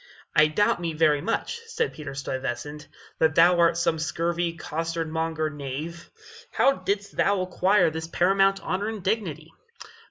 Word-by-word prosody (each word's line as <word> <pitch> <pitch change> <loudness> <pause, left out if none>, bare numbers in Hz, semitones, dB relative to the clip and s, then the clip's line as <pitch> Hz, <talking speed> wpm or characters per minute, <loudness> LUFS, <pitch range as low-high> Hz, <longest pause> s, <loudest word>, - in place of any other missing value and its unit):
"I 150 0 +6
doubt 175 +3 +1
me 165 -2 -3
much," 160 - +1
said 460 0 -2
Peter 145 -3 -8
Stuyvesant, 135 +2 -5 0.3
"that 160 -1 +3
thou 175 +1 +5
art 170 0 +4
some 165 -1 +1
scurvy 170 +1 -1
costard 165 +1 -3
monger 160 -1 -1
knave. 145 +4 -6 0.4
How 275 - +3
didst 200 +2 -3
thou 200 -1 +2
acquire 185 -1 +2
this 160 +1 -5
paramount 195 +3 +2
honor 200 +3 -2
and 215 -4 -6
dignity?" 165 -6 -2
165 Hz, 140 wpm, -25 LUFS, 155-190 Hz, 0.4 s, I